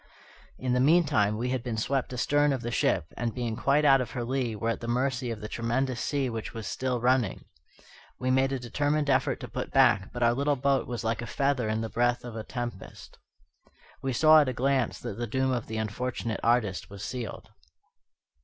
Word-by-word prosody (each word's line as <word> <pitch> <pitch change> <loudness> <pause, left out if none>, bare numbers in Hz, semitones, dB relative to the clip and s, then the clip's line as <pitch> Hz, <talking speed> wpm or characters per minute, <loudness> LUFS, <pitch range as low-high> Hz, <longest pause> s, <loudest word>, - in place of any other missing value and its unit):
In 125 -1 -1
the 125 - +2
meantime 135 -8 +3
we 125 +3 -2
had 130 -2 -1
been 120 -2 -4
swept 130 +4 -1
astern 145 +3 +2
of 130 - -3
the 120 - -3
ship, 80 -7 0
and 115 -1 -3
being 120 -3 -2
quite 140 +5 +2
out 135 -2 +6
of 125 - -4
her 120 - -3
lee, 125 -2 -1
were 115 +2 -1
at - - -4
the 115 - -6
mercy 125 +1 0
of 110 -2 -5
the 105 - -5
tremendous 120 +3 -1
sea 140 -2 0
which 115 -1 -5
was 110 -1 -5
still 130 -2 -2
running. 125 -4 +1 0.7
We 130 0 0
made 130 +1 +3
a 135 - 0
determined 145 +4 0
effort - - +1
to - - -6
put - - -5
back, 95 - +3
but 120 0 -2
our 120 0 +4
little 140 +3 +1
boat 135 0 +1
was 120 -2 -4
like 115 +1 -1
a 120 - -5
feather 135 -3 0
in 110 +1 -1
the 115 - -2
breath 120 +1 0
of 120 - -7
the 110 -1 -5
tempest. 120 -5 -7 0.8
We 135 - -1
saw 155 +5 +6
at 140 - +1
a - - -2
glance 130 -1 0
that 100 - -6
the 120 - -2
doom 130 +4 0
of 120 -3 -2
the 110 - -4
unfortunate 110 +1 -3
artist 115 -5 +1
was 100 0 -9
sealed. 120 -2 -6
125 Hz, 215 wpm, -28 LUFS, 115-135 Hz, 0.8 s, out